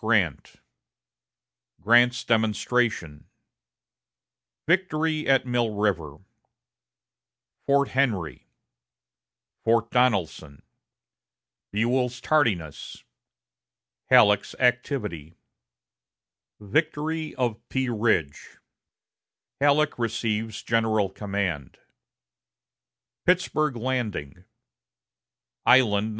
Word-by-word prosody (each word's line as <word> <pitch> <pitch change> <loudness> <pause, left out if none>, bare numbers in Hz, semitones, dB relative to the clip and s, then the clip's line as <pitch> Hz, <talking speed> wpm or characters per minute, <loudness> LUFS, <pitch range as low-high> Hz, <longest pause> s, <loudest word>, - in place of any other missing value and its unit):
Grant 105 - 0 1.3
Grant's 120 +6 +3
Demonstration 110 -7 0 1.4
Victory 160 -3 0
at 135 -1 +3
Mill 120 -3 -1
River 85 -8 -1 1.5
Fort 140 0 +2
Henry 110 - -1 1.2
Fort 115 0 +1
Donelson 95 - 0 1.1
Buell's 125 +3 0
Tardiness 105 - -1 1.1
Halleck's 105 -1 +4
Activity 120 - -1 1.2
Victory 155 +7 -2
of 120 -4 -1
Pea 130 -1 -1
Ridge 105 -11 -1 1.0
Halleck 145 0 +2
Receives 110 -1 -2
General 110 -3 +1
Command 95 -8 -4 1.5
Pittsburg 155 -6 +1
Landing 110 - -4 1.2
Island 110 -5 +4
No. - - -5
115 Hz, 60 wpm, -25 LUFS, 100-130 Hz, 1.5 s, Halleck's